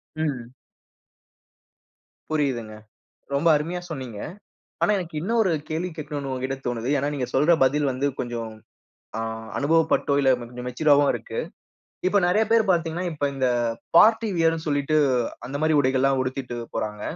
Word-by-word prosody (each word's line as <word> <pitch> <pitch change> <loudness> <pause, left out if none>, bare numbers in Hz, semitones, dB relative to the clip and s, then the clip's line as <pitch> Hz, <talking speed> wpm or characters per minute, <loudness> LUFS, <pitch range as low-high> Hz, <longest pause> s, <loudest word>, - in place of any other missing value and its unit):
ம். 130 -6 -3 1.8
புரியுதுங்க. 130 -8 -1 0.6
ரொம்ப 160 +4 +1
அருமையா 170 +4 -2
சொன்னீங்க. 130 -8 -6 0.6
ஆனா, - - +3
எனக்கு 175 -3 -6
இன்னொரு 220 0 +1 0.2
கேள்வி 165 +3 -2
கேட்கணும்னு 145 -2 -5
உங்கட்ட 130 +1 -3
தோணுது. 120 0 -2
ஏனா, 140 - 0
நீங்க 130 -3 -2
சொல்ற 150 +6 +4
பதில் 140 +2 +2
வந்து 135 +3 0
கொஞ்சம் 115 -2 -4 0.7
ஆ - - -2 0.4
அனுபவப்பட்டோ 160 -1 +2
இல்ல 135 -1 +3
கொஞ்சம் 125 +1 -8
மெச்சூர் 150 +5 -2
றாவோ 145 0 +6
இருக்கு. - - -6 0.7
இப்போ 205 +2 +3
நெறைய 205 +5 +3
பேர் 230 -1 +5
பார்த்தீங்கன்னா, 170 0 0
இப்ப 145 -2 -3
இந்த 130 -1 0 0.5
பார்ட்டி 225 +4 +6
வியர் 165 -1 +3
ன்னு 160 - -6
சொல்லிட்டு, 145 +1 +1 0.5
அந்த 140 +2 -4
மாரி 155 0 +3
உடைகள் 130 -1 +1
எல்லாம் 135 -1 +3
உடுத்திட்டு 130 -1 -4 0.2
போறாங்க. 105 -1 -3
145 Hz, 145 wpm, -24 LUFS, 130-165 Hz, 1.8 s, றாவோ